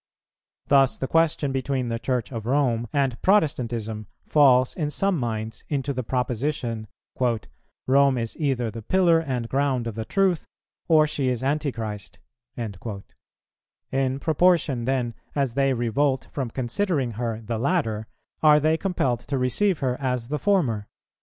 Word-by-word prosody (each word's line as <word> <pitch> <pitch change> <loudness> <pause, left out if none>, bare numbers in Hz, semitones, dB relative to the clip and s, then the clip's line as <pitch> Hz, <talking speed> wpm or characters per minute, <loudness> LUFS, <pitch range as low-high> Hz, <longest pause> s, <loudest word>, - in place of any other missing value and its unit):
Thus 135 -2 +4
the 130 - -3
question 160 -3 +2
between 130 -1 -1
the 115 0 -2
Church 125 -1 -2
of 115 -3 -5
Rome 125 -4 +1
and 135 -4 0
Protestantism 120 - +1 0.2
falls 130 -4 +4
in 150 -4 -2
some 195 +5 +1
minds 110 -5 -3
into 140 -1 -1
the 130 - -2
proposition, 125 -2 -2 1.0
"Rome 135 0 +4
is 115 -1 -3
either 130 -6 0
the 115 +1 -7
pillar 170 - +3
and 130 -7 -3
ground 135 -2 0
of 115 - -3
the 110 +1 -4
Truth, 190 - +1 0.4
or 155 -2 +6
she 145 -3 -2
is 125 0 -2
Antichrist;" 120 -8 -3 0.4
in 115 -4 -4 1.5
proportion, 160 -5 +2
then, 125 -2 0 0.2
as 135 -4 0
they 135 +1 +2
revolt 130 +3 0
from 135 -4 -3
considering 135 - -1
her 115 0 -3
the 115 0 -4
latter 115 -7 0 0.3
are 150 -1 +6
they 155 +2 +2
compelled 150 - 0
to 140 - -1
receive 160 +9 +1
her 125 -2 -1
as 125 -3 -1
the 150 0 -1
former. 135 - +1
130 Hz, 145 wpm, -24 LUFS, 115-150 Hz, 1.5 s, or